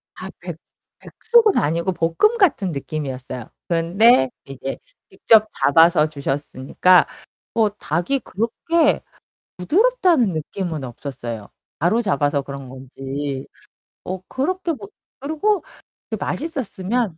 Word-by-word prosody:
아 -, -, -7 dB
백 -, -, -7 dB, 0.4 s
백숙은 450 Hz, -3 st, +3 dB
아니고 170 Hz, +5 st, +1 dB
볶음 170 Hz, -, +2 dB
같은 265 Hz, -, +3 dB
느낌이었어요. 130 Hz, -4 st, -5 dB, 0.2 s
그런데 170 Hz, -, +4 dB, 0.2 s
이제 135 Hz, 0 st, -6 dB, 0.3 s
직접 215 Hz, -1 st, +4 dB
잡아서 165 Hz, +2 st, +5 dB
주셨으니까 145 Hz, +4 st, +2 dB, 0.5 s
뭐 220 Hz, -2 st, +3 dB
닭이 205 Hz, -, -1 dB
그렇게 290 Hz, -, 0 dB, 0.6 s
부드럽다는 350 Hz, -, +3 dB
느낌은 160 Hz, -1 st, -4 dB
없었어요. 120 Hz, -4 st, -7 dB, 0.3 s
바로 195 Hz, +9 st, +2 dB
잡아서 145 Hz, -, +1 dB
그런 140 Hz, -1 st, -8 dB
건지. 135 Hz, +1 st, -5 dB, 0.6 s
어 185 Hz, +1 st, -4 dB
그렇게 345 Hz, +6 st, -1 dB
뭐 210 Hz, -9 st, -9 dB, 0.3 s
그리고 315 Hz, +9 st, 0 dB, 0.5 s
그게 -, -, -3 dB
맛있었으면 235 Hz, -, -2 dB
180 Hz, 260 characters per minute, -21 LUFS, -, 0.6 s, 잡아서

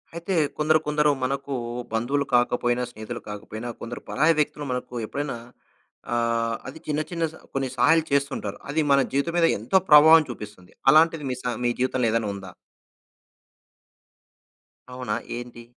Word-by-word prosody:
అయితే, 170 Hz, +3 st, -3 dB, 0.2 s
కొందరు 155 Hz, +1 st, +3 dB
కొందరూ 150 Hz, 0 st, +3 dB
మనకూ 135 Hz, +1 st, -2 dB, 0.4 s
బంధువులు 135 Hz, +6 st, 0 dB
కాకపోయినా, 120 Hz, 0 st, +2 dB
స్నేహితులు 110 Hz, +2 st, -7 dB
కాకపోయినా, 110 Hz, +3 st, -7 dB
కొందరు 115 Hz, +1 st, -6 dB
పరాయి 155 Hz, +4 st, +3 dB
వ్యక్తులు 150 Hz, 0 st, -1 dB
మనకు 125 Hz, 0 st, -4 dB
ఎప్పుడైనా 140 Hz, +2 st, -4 dB, 0.8 s
ఆహ్, 115 Hz, -1 st, 0 dB
అది 140 Hz, +5 st, -8 dB
చిన్న 150 Hz, 0 st, 0 dB
చిన్న 170 Hz, -2 st, -3 dB
స -, -, -14 dB, 0.2 s
కొన్ని 135 Hz, -1 st, -1 dB
సహాయాలు 160 Hz, +7 st, +4 dB
చేస్తుంటారు. 140 Hz, -8 st, -1 dB
అది 155 Hz, +3 st, +1 dB
మన 140 Hz, -, +6 dB
జీవితం 140 Hz, +5 st, 0 dB
మీద 170 Hz, -, +5 dB
ఎంతో 115 Hz, -, +2 dB
ప్రభావం 155 Hz, +2 st, +8 dB
చూపిస్తుంది. 105 Hz, -6 st, -9 dB, 0.2 s
అలాంటిది 160 Hz, +1 st, +5 dB
మీ 125 Hz, -, -2 dB
సా 125 Hz, -, -2 dB
మీ 120 Hz, -, +2 dB
జీవితంలో 130 Hz, -1 st, +1 dB
ఏదైన 115 Hz, -1 st, 0 dB
ఉందా? 95 Hz, -2 st, -9 dB, 2.4 s
అవునా, 125 Hz, 0 st, -3 dB, 0.2 s
ఏంటి? 120 Hz, -1 st, -9 dB
130 Hz, 140 wpm, -25 LUFS, 120-150 Hz, 2.4 s, ప్రభావం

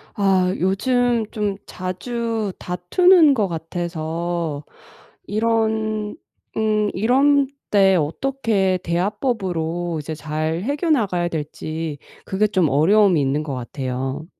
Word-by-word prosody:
아 190 Hz, -2 st, +2 dB
요즘 240 Hz, +5 st, +1 dB
좀 210 Hz, -3 st, -1 dB
자주 220 Hz, +3 st, -3 dB
다투는 300 Hz, -, +4 dB
것 210 Hz, -5 st, +1 dB
같아서 165 Hz, -2 st, -3 dB, 0.6 s
이런 220 Hz, -1 st, 0 dB, 0.4 s
응 215 Hz, -1 st, +1 dB
이런 275 Hz, +7 st, +3 dB, 0.2 s
때 195 Hz, -2 st, +5 dB
어떻게 195 Hz, -, 0 dB
대화법으로 175 Hz, -, -1 dB
이제 155 Hz, +2 st, -5 dB
잘 155 Hz, +2 st, -3 dB
해겨 285 Hz, -, -1 dB
나가야 195 Hz, -, +2 dB
될지 155 Hz, -1 st, -5 dB, 0.3 s
그게 200 Hz, +3 st, +1 dB
좀 185 Hz, -6 st, +2 dB
어려움이 180 Hz, +4 st, +4 dB
있는 140 Hz, +2 st, 0 dB
것 150 Hz, -3 st, -5 dB
같아요. 130 Hz, +3 st, -4 dB
190 Hz, 210 characters per minute, -21 LUFS, 160-220 Hz, 0.6 s, 때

